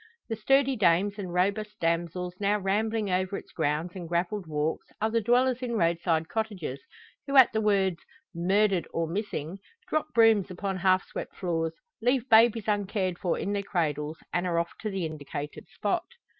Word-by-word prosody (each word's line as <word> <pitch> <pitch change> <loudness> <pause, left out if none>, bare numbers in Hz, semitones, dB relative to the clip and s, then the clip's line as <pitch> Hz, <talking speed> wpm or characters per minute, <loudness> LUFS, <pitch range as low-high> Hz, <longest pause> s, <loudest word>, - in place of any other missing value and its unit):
The 225 - -1
sturdy 270 +5 +3
dames 200 0 +2
and 185 -3 -4
robust 200 +4 0
damsels 170 +2 -1
now 205 +1 +2
rambling 210 +1 0
over 185 +2 0
its - - -11
grounds 155 +2 -1
and 175 -3 -7
gravelled 175 +2 -1
walks 150 +1 -2
are 220 +1 0
the 230 0 +2
dwellers 250 +3 +2
in 245 -2 -2
roadside 165 -2 +1
cottages, 195 - -3 0.5
who 275 0 +2
at 260 - +8
the 220 - +1
words 195 -4 +2 0.3
"Murdered 190 +1 +2
or 165 - +1
Missing," 185 -1 -4 0.3
drop 310 0 0
brooms 225 -4 +5
upon 190 +1 -3
half 185 +1 +3
swept - - -7
floors, 165 -3 -2 0.3
leave 250 +1 +1
babies 225 -1 +5
uncared 200 -3 -1
for 180 - 0
in 200 - -2
their 200 - 0
cradles, 155 -5 -2 0.2
and 175 +1 0
are 170 -1 0
off 170 0 0
to 215 - -3
the 190 -4 -2
indicated 150 -1 -6
spot. 335 - -1
190 Hz, 170 wpm, -28 LUFS, 170-215 Hz, 0.5 s, at